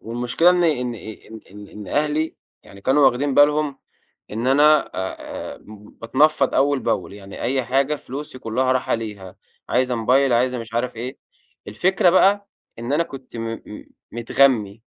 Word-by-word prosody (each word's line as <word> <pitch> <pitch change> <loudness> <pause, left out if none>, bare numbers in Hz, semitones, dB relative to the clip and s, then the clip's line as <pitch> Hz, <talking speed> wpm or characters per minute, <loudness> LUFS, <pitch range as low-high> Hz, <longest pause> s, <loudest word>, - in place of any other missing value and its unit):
والمشكلة 120 +9 +1
إن 180 -1 +2
إن 125 -6 0
إن 110 0 -11
إن 105 +1 -12
إن 105 -1 -10
أهلي 150 - 0 0.3
يعني 100 - -15
كانوا 135 +6 +4
واخدين 135 +2 +1
بالهم 145 -1 +3 0.5
إن 115 +4 -3
أنا 150 +2 +4
آآ، 95 0 -6
باتنفض 130 +7 0
أوّل 140 0 +2
بأول 90 -6 -2
يعني 100 -1 -10
أي 130 +1 0
حاجة 135 +4 +1
فلوسي 140 -1 -8
كلّها 130 +3 0
رايحه 130 -2 0
ليها، 100 -4 -7 0.3
عايزة 125 0 +1
موبايل 130 +3 +2
عايزة 125 +1 +1
مش 115 -1 -9
عارف 120 0 -2
إيه. 125 +3 -6 0.5
الفكرة 180 - +2
بقى 200 +2 +3 0.3
إن 120 +4 -4
أنا 160 +3 +3
كنت 135 -6 -10
م 115 - -4 0.3
م 105 - -10 0.3
متغمي 115 -3 +1
125 Hz, 150 wpm, -21 LUFS, 115-145 Hz, 0.5 s, كانوا